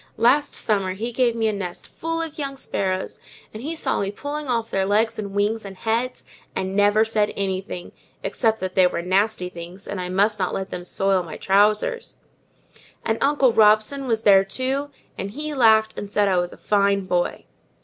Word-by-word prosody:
Last 270 +6 +3
summer, 195 -4 0
he 230 +5 -4
gave 240 -1 +1
me 225 -1 +1
a 215 - 0
nest 185 -3 -5
full 330 0 -3
of 320 -1 -7
young 275 -2 -3
sparrows, 190 -6 -2 0.3
and 215 - -7
he 315 +6 -4
saw - - -1
me 195 - -1
pulling 290 +7 -5
off 230 -3 -1
their 195 - +1
legs 210 +4 +1
and 200 -2 -5
wings, 210 +2 0
and 195 -2 -9
heads, 235 +4 -1 0.3
and 190 0 -2
never 205 +2 +4
said 215 -2 +1
anything; 190 -2 -3 0.3
except 220 -3 0
that 185 0 -3
they 185 -1 +5
were 170 -1 -3
nasty 190 +1 +1
things, 175 +2 -10
and 195 -2 -4
I 180 - -4
must 205 +3 +2
not 185 - -1
let 190 0 -4
them 175 - -5
soil 195 +1 +1
my 165 -3 -8
trousers: 210 - +2 0.9
and 220 0 0
Uncle 275 -4 +3
Robson 215 +6 +3
was 225 -2 0
there 195 -2 +7
too, 260 +8 -2 0.3
and 195 - -3
he 300 +7 -5
laughed, 220 -4 +4
and 205 - -6
said 205 0 +2
I 185 -2 +3
was 175 0 -2
a - - -12
fine 200 -1 +1
boy." 175 -1 -1
210 Hz, 195 wpm, -23 LUFS, 190-235 Hz, 0.9 s, there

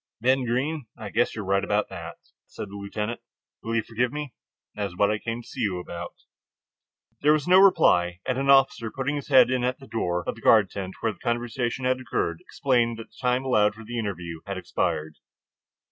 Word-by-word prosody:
"Ben 130 +2 +2
Greene, 130 +3 -1
I 105 -2 -7
guess 120 - +1
you 105 - -4
are - - -9
right 100 +1 +1
about 105 +1 0
that," 85 -3 -7 0.3
said - - -7
the 100 - -10
lieutenant. 105 +3 -4 0.4
"Will 115 0 -3
you 115 - +1
forgive 120 +3 -1
me? 145 -3 -5 0.4
That 105 -1 -2
is 90 - -12
what 100 +2 +3
I 105 - -1
came 115 +1 -4
to - - -17
see - - -9
you 95 -5 0
about." 85 -1 -7 1.1
There 150 +1 +5
was 155 0 0
no 185 +1 +7
reply, 90 - +4
and 130 0 -1
an 135 0 -1
officer 135 -4 +4
putting 135 +5 -2
his 145 - -5
head 130 -3 +6
in 130 -1 0
at 125 +1 0
the 135 - -13
door 90 -8 -1
of - - 0
the 115 - -14
guard 105 -5 +5
tent 95 -2 -5
where 110 - 0
the - - -22
conversation 120 +1 -2
had 130 0 +1
occurred, 85 -8 -2
explained 120 -4 0
that 115 - -10
the - - -22
time 125 +2 +1
allowed 105 -5 +3
for 115 - -11
the 120 +2 -4
interview 85 -6 -4
had 100 -1 -3
expired. 80 -4 -2
115 Hz, 220 wpm, -26 LUFS, 100-130 Hz, 1.1 s, no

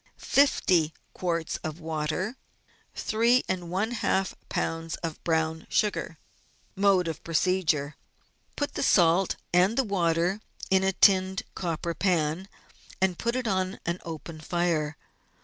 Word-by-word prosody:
50 180 - +3 0.2
quarts 170 -3 -2
of 155 0 -6
water. 160 +7 -2 0.6
3I 235 +3 +2
lbs. 185 -3 -2
of 165 -2 -5
brown 160 -1 0
sugar. 205 -6 0 0.6
Mode 195 -2 +3
of 160 -1 -5
Procedure. 165 -4 +1 0.3
— - - -40
Put 290 - -2
the - - -3
salt 175 +1 +4 0.2
and 185 +6 +4
the 270 - +4
water 180 -1 +1 0.3
in 190 0 +4
a 190 0 +2
tinned 190 0 +4
copper 170 -1 -3
pan, 170 0 0 0.5
and 185 -2 +1
put 235 +1 -1
it 255 -2 -1
on 185 -1 -1
an 170 +1 -1
open 160 0 -7
fire. 160 -3 0
175 Hz, 120 wpm, -27 LUFS, 165-195 Hz, 0.6 s, salt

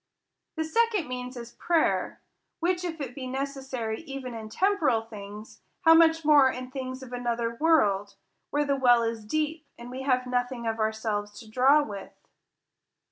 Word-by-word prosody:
— - - -57
The 320 - +1
second 425 +1 +1
means 250 0 -5
is 235 -1 -8
prayer; 335 -2 0 0.4
which, 355 +1 0
if 330 -3 -4
it 265 -4 -5
be 255 0 -6
neces 270 +1 -4
sary 230 -4 -3
even 270 -5 -7
in 220 -1 -7
temporal 310 - +2
things, 210 -1 -10 0.2
how 325 -3 +7
much 325 -1 +5
more 290 -3 +7
in 255 0 -6
things 260 -1 -5
of 250 -1 -10
another 235 -1 -1
world, 205 -9 +2 0.3
where 295 0 +1
the 280 -1 +1
well 245 -3 +4
is 230 -1 -3
deep, 310 +6 -2
and 240 +1 -9
we 260 +1 -5
have 255 -2 +1
nothing 245 -1 -2
of 225 0 -2
ourselves 215 -1 -2
to 225 - -13
draw 265 +7 +4
with 200 -7 -8
255 Hz, 175 wpm, -27 LUFS, 230-300 Hz, 0.4 s, how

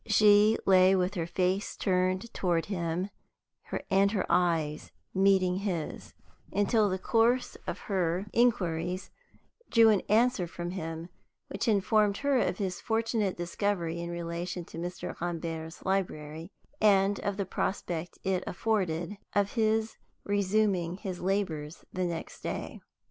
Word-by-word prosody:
She 210 0 +6
lay 190 0 +6
with 185 +1 +1
her 170 -4 -2
face 185 +3 0
turned 185 +3 0
toward 175 -3 0
him 180 0 -2 0.8
and 195 +1 +4
her 200 -4 0
eyes 160 -4 +1 0.2
meeting 190 -1 +3
his, 185 -6 -4 0.4
until 205 +1 +2
the 185 - -1
course 230 +6 +2
of - - -2
her 185 -1 0
inquiries 185 -6 +1 0.6
drew 230 -1 +6
an 210 -3 +4
answer 225 -3 +3
from 175 +1 -5
him, 165 -2 -5 0.4
which 195 - -3
informed 210 -1 +3
her 280 -2 +4
of 190 - 0
his 185 -3 -3
fortunate 225 -3 0
discovery 175 -1 -1
in 170 - -4
relation 170 +1 -4
to 165 - -9
Mr. 175 0 -5
Rambert's 165 -1 -4
library, 165 -3 -2 0.3
and 200 -1 +4
of 200 -1 -2
the 200 - -1
prospect 175 -2 -3
it 190 -1 0
afforded 185 -3 -1 0.2
of 205 -1 +2
his 220 -1 +1 0.3
resuming 200 -3 +1
his 185 -2 -5
labors 175 -5 -2
the 185 0 -1
next 170 -2 -5
day. - - -5
190 Hz, 130 wpm, -29 LUFS, 175-205 Hz, 0.8 s, She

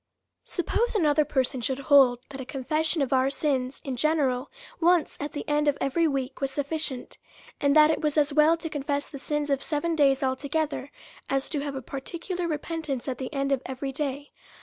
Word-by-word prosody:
Suppose 460 +6 0
another 305 -6 +4
person 265 -2 0
should 260 +2 -1
hold 270 -3 +5
that 270 -1 -7
a - - -4
confession 305 +4 0
of 270 - -1
our 260 +1 +3
sins 275 -2 -1
in 265 -2 -3
general, 275 -2 +1 0.3
once 345 -1 +3
at 290 - -4
the 295 - -5
end 295 0 +1
of 290 - +2
every 325 +5 +2
week, 270 -2 -3
was 275 - +1
sufficient; 285 -1 -3 0.4
and 285 0 +2
that 305 0 +7
it - - -1
was 300 -1 0
as 295 -1 +3
well 310 +3 +5
to 330 - -6
confess 285 -1 -2
the 275 - -9
sins 295 +1 -1
of 275 -1 +1
seven 325 +2 -1
days 275 -2 +3
altogether, 285 +2 -1 0.4
as 270 0 0
to 300 - -1
have 280 -1 -4
a 265 - -5
particular 340 +7 -4
re 310 -3 0
pentance 300 -5 -4
at 255 -2 -3
the 260 - -4
end 275 -1 -1
of 270 -2 +2
every 265 +1 -4
day. 280 0 -4
285 Hz, 200 wpm, -27 LUFS, 270-310 Hz, 0.4 s, that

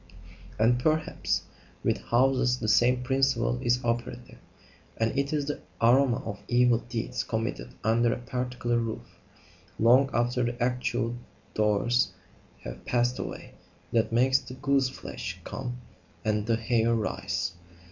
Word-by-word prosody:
And, 120 +3 +3
perhaps, 155 +4 0 0.4
with - - +1
houses 125 0 +2
the 110 - -3
same 125 +3 +4
principle 130 -2 +1
is 125 0 +1
operative, 120 +1 -3 0.6
and 115 +2 0
it 140 0 0
is 150 -2 0
the 145 0 -3 0.2
aroma 125 +1 +4
of 100 -3 -5
evil 120 -1 +4
deeds 120 -1 -3
committed 110 - -3
under 115 +2 +3
a - - -1
particular 125 -1 -2
roof, 115 -1 -5 0.6
long 125 +4 +5
after 120 +1 +1
the 120 0 -2
actual 120 -1 -1 0.4
doers 110 +3 +2 0.5
have - - -8
passed 120 0 +1
away, - - -6 0.4
that 115 -1 +2
makes 130 +3 +4
the 125 -1 -10
gooseflesh 135 -1 -1
come 125 -2 -5 0.5
and 105 0 0
the 115 - +3
hair 115 0 +2
rise. 95 -4 -2
120 Hz, 130 wpm, -28 LUFS, 115-125 Hz, 0.6 s, long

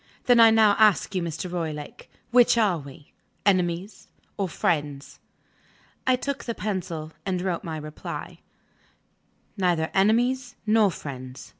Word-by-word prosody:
"Then 245 -1 +5
I 225 -1 +9
now 220 -2 +5
ask 215 -3 +4
you, 185 - 0
Mr. 165 +1 -4
Roylake: 155 -4 -5 0.2
Which 245 -1 +5
are 200 -7 +2
we 140 0 -13 0.3
enemies 185 0 0 0.3
or 195 -2 -2
friends?" 145 -4 -2 0.9
I 255 - +5
took 280 +2 -4
the 235 - -3
pencil, 180 -6 -4
and 185 -2 -2
wrote 180 -2 -2
my 160 -2 -5
reply: 155 0 -7 1.2
"Neither 175 -4 +1
enemies 245 +5 +2
nor 215 -1 +4
friends. 130 -6 -8
185 Hz, 130 wpm, -25 LUFS, 160-220 Hz, 1.2 s, I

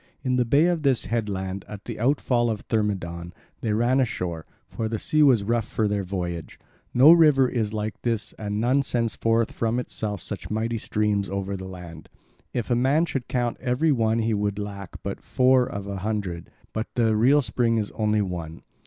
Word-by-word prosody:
In 130 -1 +1
the 125 - +2
bay 140 +7 +4
of 175 -2 +1
this 135 -4 +2
headland, 100 -4 -2
at 105 -1 -9
the - - -6
outfall 120 -1 +2
of 110 -2 -2
Thermodon, 90 -6 -2 0.3
they 110 - -2
ran 120 +5 +2
ashore, 90 -10 -2 0.2
for 110 -1 -3
the 110 - -2
sea 155 +7 +1
was 130 -8 +5
rough 115 +1 0
for 110 - 0
their 100 -1 -1
voyage. 90 -3 -4 0.3
No 135 +6 +8
river 150 -6 +6
is 110 -4 -1
like 110 0 -4
this, 115 -3 -2
and 105 -1 -3
none 125 +5 +3
sends 120 -4 -1
forth 115 0 +1
from 115 +1 -1
itself 105 -4 -3
such - - -5
mighty 115 +2 -1
streams 105 -2 0
over 100 0 -3
the 95 0 -7
land. 85 -4 -10 0.4
If 120 0 -3
a - - +4
man 135 +7 +3
should 135 -7 -4
count 120 -2 -1
every 130 +5 +1
one 115 -4 +2
he 115 0 +1
would 100 -1 -1
lack 100 -2 -6
but - - -5
four 130 -1 +3
of 100 -1 -5
a 100 -1 -4
hundred, 95 -4 -3 0.2
but 110 +2 -2
the 115 -3 +2
real 135 +7 +4
spring 115 0 +1
is 105 -2 -2
only 105 -1 +1
one. 85 -3 -6
110 Hz, 195 wpm, -25 LUFS, 100-125 Hz, 0.4 s, No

